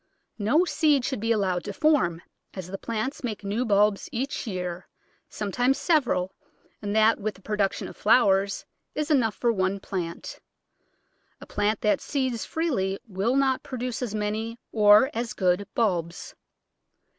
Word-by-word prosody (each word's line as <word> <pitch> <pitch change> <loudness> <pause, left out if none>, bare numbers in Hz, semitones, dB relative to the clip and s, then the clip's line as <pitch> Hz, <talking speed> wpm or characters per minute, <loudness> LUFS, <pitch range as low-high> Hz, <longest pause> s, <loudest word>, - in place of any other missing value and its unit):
No 250 - +3
seed 295 -7 +2
should 265 - -2
be 225 +2 -1
allowed 190 -5 +1
to 205 - -4
form, 275 - +2 0.3
as 190 -3 -5
the 195 +2 -7
plants 230 +6 -3
make 220 -4 -4
new 205 +5 -1
bulbs 205 -1 +2
each 265 +2 -3
year, 180 -3 -4 0.4
sometimes 245 +6 0
several, 240 - +1 0.5
and 205 0 -3
that, 220 +1 +4
with 215 0 -3
the 195 - -18
production 210 -2 -1
of - - -10
flowers, 200 -3 +3 0.3
is 305 +1 -1
enough 235 -7 +2
for 235 -1 +1
one 190 0 0
plant. 175 -4 -5 1.0
A - - -11
plant 205 +1 -1
that 210 -2 +2
seeds 260 -5 -2
freely 240 - -1
will 205 +5 0
not 270 -1 +2
pro 255 - -7
duce 245 0 -3
as 225 -4 -3
many 215 +2 -2
or 210 +4 +6
as 230 0 -3
good 185 +1 +1
bulbs. 175 -7 -1
215 Hz, 155 wpm, -26 LUFS, 195-250 Hz, 1.0 s, or